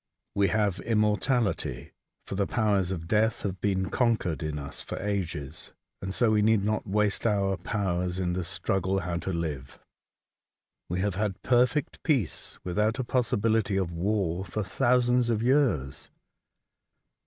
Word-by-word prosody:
We 100 0 +3
have 105 -3 +1
immortality, 110 +1 0 0.3
for - - -6
the 100 0 0
powers 100 -5 +1
of 85 -3 -4
death 110 +3 +2
have 95 -2 -3
been 95 -2 0
conquered 115 -10 +1
in 75 -2 -3
us 70 -1 -6
for - - -6
ages, 85 -8 -3 0.3
and 95 - -3
so 110 +3 +3
we 105 -1 +3
need 110 -1 +3
not 110 +1 -1
waste 105 +2 +1
our 100 -2 +1
powers 90 -2 -1
in 90 -2 0
the 90 0 -1
struggle 95 +2 0
how 85 0 -2
to 85 +3 -3
live. 75 -6 -4 1.1
We 90 +2 -1
have 100 0 0
had 100 0 -2
perfect 125 +3 +2
peace, 135 - 0
without 105 +6 0
a 130 - -1
possibility 110 -4 +1
of 95 -3 -1
war, 95 0 0
for 105 +2 -3
thousands 125 +1 +2
of 115 -1 +1
years. 120 - +1
100 Hz, 150 wpm, -28 LUFS, 90-110 Hz, 1.1 s, We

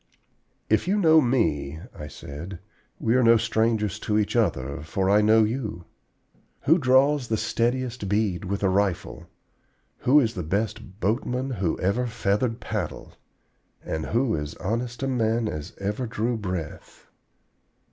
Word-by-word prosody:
"If 110 +9 +2
you 200 +3 +2
know 160 -5 +6
me," 80 - 0 0.2
I 75 - -7
said, 80 +6 -8 0.4
"we 115 - +1
are 130 - +4
no 115 -1 +6
strangers 110 -2 0
to 105 -1 0
each 105 +1 0
other, 70 - 0
for 95 +5 0
I 105 +1 +5
know 110 +1 +5
you. 105 -6 -3 0.8
Who 165 +5 +4
draws 135 0 +3
the 110 - 0
steadiest 120 -2 -1
bead 100 -4 0
with 100 +2 -3
a 95 - +4
rifle; 95 -1 -1 0.7
who 140 +4 +5
is 115 -5 +1
the 90 - -4
best 100 +2 -3
boatman 125 +5 -1
who 95 -8 -1
ever 110 +7 0
feathered 115 0 0
paddle, - - -5 0.7
and 80 -1 -3
who 120 0 +1
is 75 -1 -3
as - - -11
honest 120 +5 -2
a - - 0
man 115 -3 +1
as 75 -6 -5
ever 105 +5 -2
drew 115 +1 -1
breath? 90 -7 -6
110 Hz, 150 wpm, -25 LUFS, 95-125 Hz, 0.8 s, know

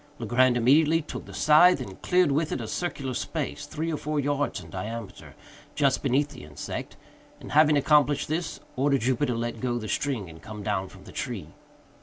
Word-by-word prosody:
Legrand 120 +2 +3
immediately 150 +6 +4
took - - -7
the - - -11
scythe, 155 +3 +6
and 95 -7 -8
cleared 180 -4 +3
with 155 +3 0
it - - -2
a 115 - -5
circular 135 -3 -3
space, 145 +2 -4
three 160 +2 -3
or - - -1
four 150 0 -2
yards 145 -3 -1
in 80 -3 -12
diameter, 110 +1 -7 0.4
just 140 -3 +2
beneath 140 +2 +1
the 140 - -11
insect, 75 0 -7 0.4
and, - - -10
having 150 0 +5
accomplished 145 0 +3
this, 160 +2 -3 0.2
ordered 140 0 +2
Jupiter 125 +2 +1
to - - -3
let 115 -1 -4
go 120 -2 0
the 110 -2 -5
string 125 -5 -1
and 80 0 -12
come 105 -1 -8
down 100 -2 -1
from - - -15
the - - -12
tree. - - -5
140 Hz, 195 wpm, -27 LUFS, 115-150 Hz, 0.4 s, scythe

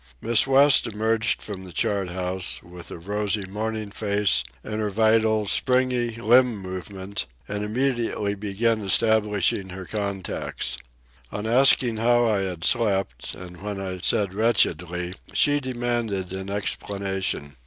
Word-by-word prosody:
Miss 115 - +3
West 135 0 +5
emerged 110 +1 0
from 100 -3 -7
the 90 - -10
chart 100 +1 -1
house, 90 +1 -3
with 85 -2 -11
a - - -7
rosy 105 +3 -2
morning 105 +1 -4
face 100 -1 +1 0.2
and 110 0 -4
her 105 - -1
vital, 110 +1 +2
springy 125 0 +1
limb 120 +1 +4
movement, 95 +1 -5 0.2
and 105 0 -3
immediately 115 -2 -1
began 105 +2 -1
establishing 105 -2 +2
her 95 +1 -7
contacts. 100 -2 -4 0.5
On 105 +1 -5
asking 120 -1 +5
how 120 +1 +3
I 105 -3 +1
had 90 -4 -4
slept, 95 - 0
and 90 -1 -11
when 105 -1 -4
I 95 -1 -5
said 100 -1 +2
wretchedly, 90 -5 +1 0.2
she 145 0 +4
demanded 120 -7 -2
an 95 +1 -5
explanation. 95 -7 -2
105 Hz, 130 wpm, -24 LUFS, 95-115 Hz, 0.5 s, West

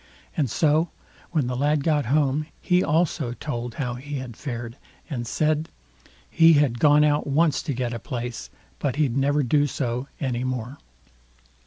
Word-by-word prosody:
And 145 -6 +1
so 155 +6 +2 0.4
when 155 -6 0
the 125 0 -2
lad 145 +2 +1
got 150 -5 +1
home, 145 +2 +1
he 180 0 +2
also 150 -6 +1
told 120 -3 -5
how 125 -4 -2
he 140 +4 -6
had 130 -4 -6
fared, 120 -2 -6 0.3
and 120 -4 -3
said, 155 +4 0 0.6
he 165 -1 +6
had 140 -6 +2
gone 150 +1 +6
out 150 -1 +2
once 150 +1 +2
to 145 - -3
get 120 -1 -2
a 115 - -4
place, 120 - -5 0.3
but 135 -3 -1
he'd 140 -5 +1
never 145 +2 +2
do 145 +3 +3
so 125 -1 -3
any 125 -3 -1
more. 130 +1 -4
140 Hz, 165 wpm, -24 LUFS, 120-150 Hz, 0.6 s, he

